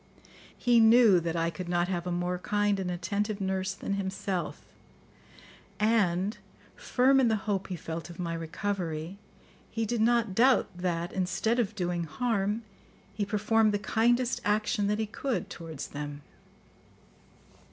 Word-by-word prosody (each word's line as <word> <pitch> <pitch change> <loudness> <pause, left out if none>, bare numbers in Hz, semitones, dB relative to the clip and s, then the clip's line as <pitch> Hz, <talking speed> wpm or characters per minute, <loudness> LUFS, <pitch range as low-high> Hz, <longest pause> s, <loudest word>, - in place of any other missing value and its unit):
He 240 -1 +4
knew 225 -4 +7
that 170 0 -3
I 165 0 0
could 175 +2 -7
not 175 0 +1
have 180 -1 -2
a - - -1
more 175 +1 -1
kind 205 0 +1
and 185 -1 -2
attentive 200 +4 -2
nurse 190 0 -1
than 200 - -3
himself; 195 -1 -3 1.2
and, 205 -3 +2 0.4
firm 265 +2 +3
in 260 - +4
the 220 - +3
hope 195 -3 -1
he 185 - -4
felt 165 +1 -6
of 170 - -10
my 170 -2 -3
recovery, 165 +1 -3 0.5
he 225 0 -2
did 230 +1 -1
not 230 -3 +2
doubt 245 -1 +3
that, 175 -1 -2
instead 195 +6 0
of 220 -2 0
doing 175 -3 -1
harm, 215 +3 -1 0.5
he 205 +1 -2
performed 215 +1 +2
the - - +2
kindest 240 +4 +1
action 210 0 +1
that 210 +1 +1
he 220 - 0
could 215 -2 -3
towards 160 -4 -7
them. 145 0 -6
200 Hz, 150 wpm, -29 LUFS, 175-220 Hz, 1.2 s, knew